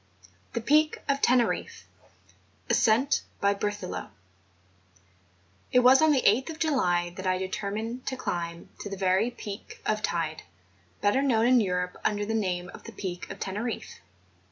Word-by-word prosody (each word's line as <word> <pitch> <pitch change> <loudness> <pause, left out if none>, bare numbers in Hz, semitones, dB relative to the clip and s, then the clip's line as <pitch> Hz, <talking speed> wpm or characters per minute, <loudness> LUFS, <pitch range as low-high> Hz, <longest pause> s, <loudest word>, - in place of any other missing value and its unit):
THE 235 - -1
PEAK 305 +5 +3
OF 280 0 +1
TENEEIFFE. 245 -1 +1 0.9
ASCENT 235 +6 +3 0.2
BY 200 0 +3
BERTHELOT. 205 -2 -4 1.6
It 250 - +6
was 255 +3 +7
on 315 -1 +5
the 270 -3 +2
8th 240 +8 +3
of 320 - -6
July 180 - +1
that 190 0 -5
I 185 0 +2
determined 210 +6 -4
to 260 - -2
climb 170 -7 -4
to 205 - -6
the 195 - -5
very 190 +4 +2
Peak 210 -4 -8
of 215 0 0
Teyde, 160 -4 -2 0.6
better 205 +7 +3
known 235 -5 +3
in 250 -1 +5
Europe 180 -2 -1
under 205 -1 0
the 225 - -2
name 180 -5 -1
of - - -12
the - - -8
Peak 180 -3 -5
of 195 - -7
Teneriffe. 210 +5 -4
210 Hz, 155 wpm, -28 LUFS, 185-250 Hz, 1.6 s, was